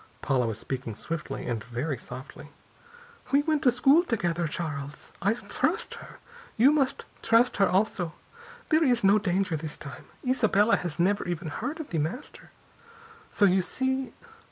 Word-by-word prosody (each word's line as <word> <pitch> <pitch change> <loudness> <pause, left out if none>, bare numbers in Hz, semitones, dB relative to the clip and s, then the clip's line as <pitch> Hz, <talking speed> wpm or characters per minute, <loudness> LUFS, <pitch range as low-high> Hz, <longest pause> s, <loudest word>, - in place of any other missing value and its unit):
Paula 130 -4 +1
was 110 -2 -3
speaking 120 -1 -5
swiftly 165 +7 -5
and 115 -3 -2
very 125 +3 -3
softly. 130 +4 -10 0.8
"We 280 +1 +4
went 310 -1 +1
to 250 - +5
school 275 +7 +5
together, 175 - -1
Charles. 150 -3 -5
I 200 +4 +2
trust 240 - -2
her. - - -12 0.4
You 255 +6 +6
must 275 -3 0 0.2
trust 230 +2 +3
her 195 - +4
also. 185 -3 0 0.5
There 315 +1 +4
is 245 -5 +2
no 200 +2 +6
danger, 185 -3 0
this 155 0 -5
time. 140 -1 -9 0.2
Isabella 220 -4 +3
has 175 -4 -4
never 195 +4 +1
even 175 -2 -3
heard 295 - -4
of 315 - -6
The 165 - -1
Master. 170 - -5 0.8
So 205 - +3
you 190 0 +4
see...." 260 +7 -2
190 Hz, 155 wpm, -27 LUFS, 150-250 Hz, 0.8 s, You